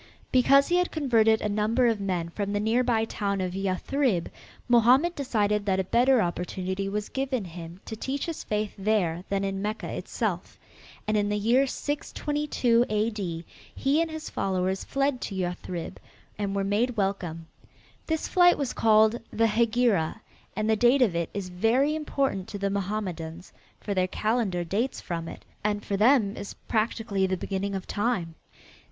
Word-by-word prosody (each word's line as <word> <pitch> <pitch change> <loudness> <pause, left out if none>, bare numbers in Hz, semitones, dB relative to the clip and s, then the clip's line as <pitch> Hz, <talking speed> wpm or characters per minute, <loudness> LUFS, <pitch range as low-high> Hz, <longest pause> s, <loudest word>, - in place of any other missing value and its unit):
Because 275 +2 +5
he 350 - +3
had 360 0 +2
converted 225 -7 +3
a - - 0
number 215 +4 +1
of 225 -3 +2
men 180 -4 -2
from 200 +3 -3
the 205 - +1
nearby 225 +1 +2
town 200 -3 -2
of 185 -1 -2
Yathrib, 195 +2 0 0.4
Mohammed 250 +8 +5
decided 210 -8 0
that 190 -1 +2
a - - +2
better 245 +5 +3
opportunity 185 +2 -3
was 210 +1 -3
given 265 -5 -2
him 170 0 -9
to 220 - -6
teach 270 +5 -3
his 330 -2 -5
faith 210 -1 -2
there 190 -5 +1
than 200 0 0
in 195 0 -2
Mecca 210 +2 -3
itself, - - -3 0.5
and 215 - +1
in 205 0 +1
the 210 - 0
year 240 +6 +3
622 290 -4 0
A.D., 210 -6 -2 0.3
he 285 +4 +2
and 330 - -1
his 315 0 -6
followers 190 0 -1
fled 275 -2 0
to 195 - -4
Yathrib 180 -2 -4 0.4
and 200 -1 -3
were 200 - 0
made 225 +5 0
welcome. 185 -5 -2 0.6
This 320 -1 -1
flight 355 -1 +5
was 280 -4 -2
called 220 +1 +4
the 225 - +2
"Hegira," 225 -5 +2 0.4
and 215 0 -1
the 220 - +4
date 245 +4 +4
of 195 -8 +1
it 170 -1 -1
is 200 -2 -5
very 230 +11 +2
important 275 -10 -1
to 205 - -6
the 200 0 -1
Mohammedans, 185 -4 -4 0.3
for 205 - -3
their 185 -1 +1
calendar 210 -3 0
dates 215 +10 -1
from 165 -2 -4
it, - - -9 0.2
and 205 0 -1
for 200 - -1
them 215 -1 +4
is 200 - -7
practically 215 -3 0
the 185 0 -1
beginning 195 +2 -3
of 190 - -4
time. 205 -6 -1
210 Hz, 170 wpm, -27 LUFS, 190-245 Hz, 0.6 s, Because